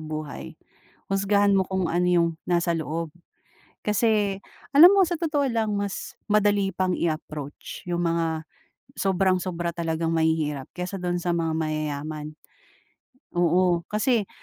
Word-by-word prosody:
buhay. 155 -1 -6 0.5
Husgahan 200 +1 +3
mo 190 - +3
kung 190 -2 -1
ano 175 +2 +1
yung 170 -1 +3 0.2
nasa 170 -1 +1
loob, 160 +1 -3 0.7
kasi 210 -2 +1 0.4
alam 345 +6 +10
mo 395 - +5
sa 350 -1 +1
totoo 300 -4 0
lang 225 -2 0
mas 200 -1 -4 0.2
madali 205 -2 +3
pang 185 0 0
i-approach 155 -3 -4
yung 175 0 0
mga 165 -1 -1 0.5
sobrang 190 -1 +2
sobra 175 -2 -3
talagang 165 -1 -2
mahihirap 160 -4 0
kaysa 180 +2 -4
do'n 175 0 -1
sa 175 0 -1
mga 165 -1 0
mayayaman, 155 -1 -3 1.0
oo 175 0 +3
kasi 215 0 +1
175 Hz, 130 wpm, -25 LUFS, 160-200 Hz, 1.0 s, alam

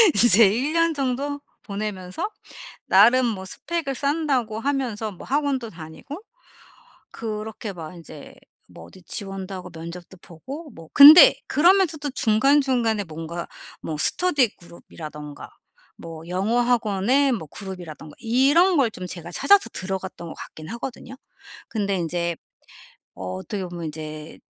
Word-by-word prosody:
이제 225 -2 +7
1 270 +8 -1
년 330 -1 +2
정도 280 +1 -2 0.2
보내면서 200 - -5 0.6
나름 240 +6 +5
뭐 195 -5 -3
스펙을 305 - -4
쌓는다고 275 -6 -1
하면서 240 -6 -2
뭐 185 - -12
학원도 275 -5 -1
다니고 170 - -10 0.9
그렇게 215 -1 -6
막 165 -1 -9
이제 155 -3 -12 0.3
뭐 - - -13
어디 185 - -16
지원도 195 0 -6
하고 180 -1 -8
면접도 170 +3 -9
보고 275 - -10
뭐 165 -7 -13
근데 315 +12 +10
그러면서도 330 -3 +3
중간중간에 240 -2 +2
뭔가 165 +1 -7 0.3
뭐 155 - -5
스터디 285 - +1
그룹이라든가 150 -4 -10 0.5
뭐 165 0 -10
영어학원에 235 +5 +1
뭐 165 -10 -3
그룹이라든가 175 -6 -9
이런 280 +10 +3
걸 255 -6 +3
좀 185 -3 -8
제가 170 -1 -8
찾아서 400 - +4
들어갔던 190 -2 -5
것 - - -8
같긴 155 0 -11
하거든요. 245 +2 -7 0.5
근데 200 -3 -1
인제 170 0 -2 0.8
어떻게 95 - -5
보면 175 -2 -6
이제 155 0 -8
215 Hz, 285 characters per minute, -23 LUFS, 175-270 Hz, 0.9 s, 근데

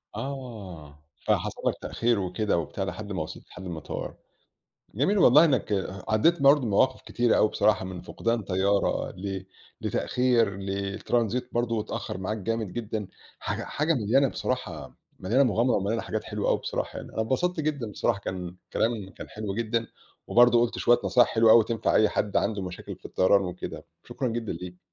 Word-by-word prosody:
آه. 100 - -7 0.3
فحصل - - 0
لك - - +3
تأخير 115 -2 0
وكده 95 +1 0
وبتاع 95 +3 -3
لحد 105 +1 -5
ما 90 -5 -2
وصلت 80 - -8
لحد 95 - -10
المطار. 80 -4 -5 0.8
جميل 190 - +2
والله 150 0 +7
إنّك 130 -9 +1 0.4
عدّيت 140 +9 +3
برضه 140 +1 +7
بمواقف 130 +3 +2
كتيرة 120 -1 +1
أوي 110 - +4
بصراحة 105 -3 +2
من 90 -1 -6
فقدان 115 -1 -2
طيارة 100 +1 +1
ل 95 0 -5 0.3
لتأخير 120 -6 +1
ل 95 0 -5
الترانزيت 110 +5 -1
برضه 115 -2 0
اتأخر 105 -3 -5
معاك 105 +4 -2
جامد 110 -1 -2
جدًا، 110 -3 -4 0.3
حاجة - - -3
حاجة 155 +3 0
مليانة 130 +4 +3
بصراحة، 85 - -4 0.2
مليانة 120 +9 +2
مغامرة 120 0 +2
ومليانة 105 +4 -1
حاجات - - -3
حلوة - - -2
أوي - - +2
بصراحة - - -4
يعني. - - -9
أنا 110 - -1
انبسطت 160 +9 0
جدًا 140 -8 -2
بصراحة 105 +1 0
كان 90 -2 -5 0.2
كلام 110 -4 -1
كان - - -10
حلو 105 -2 -5
جدًا، 115 0 -1 0.4
وبرضه 120 0 +6
قُلت 120 - 0
شوية 120 0 +4
نصايح 125 -2 +4
حلوة 115 -1 +4
أوي 115 -1 +8
تنفع 115 -1 0
أي 110 - +5
حد 105 - -1
عنده 105 -3 0
مشاكل 90 -1 -7
في - - -31
الطيران 100 +2 +3
وكده. 90 0 -6 0.2
شكرًا 130 - -3
جدًا 115 -2 -3
ليك. 90 +1 -8
110 Hz, 170 wpm, -27 LUFS, 95-120 Hz, 0.8 s, أوي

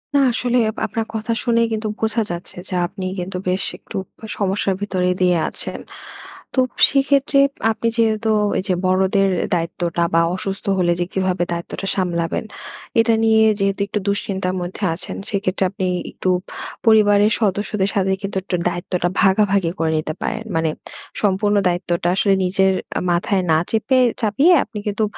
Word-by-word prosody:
না, 280 - +6
আসলে 250 +1 0 0.3
আপনার 225 -1 -3
কথা 220 +1 -3
শুনেই 230 -2 +3
কিন্তু 215 0 -2
বোঝা 225 +1 0
যাচ্ছে 175 +1 -7
যে - - -6
আপনি 190 0 -7
কিন্তু 180 +1 -4
বেশ 185 +1 +1
একটু 210 - -8 0.4
সমস্যার 195 -1 0
ভিতরে 185 -3 0
দিয়ে 180 -1 +4
আছেন। - - -6 0.8
তো 260 - +4 0.3
সেক্ষেত্রে 275 0 +2 0.3
আপনি 230 +1 -2
যেহেতু 220 -1 +1 0.3
এই - - -3
যে 185 - +2
বড়দের 190 +1 +2 0.3
দায়িত্বটা 170 0 -1
বা 165 - +5
অসুস্থ 195 +1 -5
হলে 175 -1 +2
যে 175 - +1
কিভাবে 185 -2 0
দায়িত্বটা 170 +3 -5
সামলাবেন। 170 +1 -1 0.5
এটা 225 0 +4
নিয়ে 220 0 +5 0.2
যেহেতু 195 0 0
একটু 210 +1 -2
দুশ্চিন্তার 195 -2 -1
মধ্যে 180 +4 -6
আছেন - - -7
সেক্ষেত্রে 195 -1 -1
আপনি 190 -2 -2 0.2
একটু 185 - -2 0.6
পরিবারের 210 -1 +5
সদস্যদের 200 -1 0
সাথে 190 -1 +1
কিন্তু 195 -1 -4
একটু 185 - -2
দায়িত্বটা 175 0 -2 0.2
ভাগাভাগি 195 -3 +3
করে 160 -1 +1
নিতে 155 0 -2
পারেন। - - -2
মানে 160 -1 +1 0.5
সম্পূর্ণ 205 +1 +2
দায়িত্বটা 175 -1 -1
আসলে 195 0 +3
নিজের 190 +1 +2 0.3
আ - - -5
মাথায় 185 +2 +1
না 155 - +5
চেপে 225 +4 +2 0.2
চাপিয়ে 270 - +4
আপনি 215 - -7
কিন্তু 210 +2 0
195 Hz, 155 wpm, -20 LUFS, 180-215 Hz, 0.8 s, না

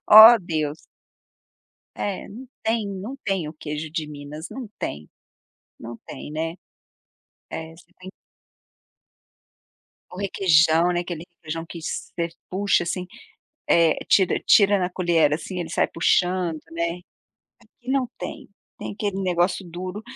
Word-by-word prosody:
Oh, 220 +3 +12
Deus. 155 -3 -2 1.2
É, 200 -2 -3
não 245 +5 -10
tem, 220 -2 0
não 200 +7 -6
tem 190 -7 -1
o - - -7
queijo 150 0 -5
de 160 -2 -3
Minas, 150 +2 -8
não 255 -5 -7
tem. 75 +1 -5 0.7
Não 115 +1 -7
tem, 145 - -8
né. 165 +2 -3 0.9
É 160 0 -6
você 175 +1 -20
tem 185 +1 -9 2.0
O 180 - -10
requeijão, 170 -3 +4
né, 175 - +1
aquele 175 -2 -5
requeijão 165 +1 -5
que 170 - -7
você 170 +1 -3 0.2
puxa 195 0 +2
assim, 180 +1 -3 0.6
eh, 165 -2 +5
tira 190 -3 +4
tira 200 -1 +6
na 180 0 -1
colher 170 -5 +2
assim 180 +4 -3
ele 165 - -5
sai - - +2
puxando, 175 -1 +1
né, 170 +1 -2 0.6
aqui 250 - -14
não 270 -2 +1
tem, - - -7 0.3
tem - - -5
aquele 200 -2 -2
negócio 180 +1 +1
duro 185 +4 -6
175 Hz, 135 wpm, -24 LUFS, 160-195 Hz, 2.0 s, Oh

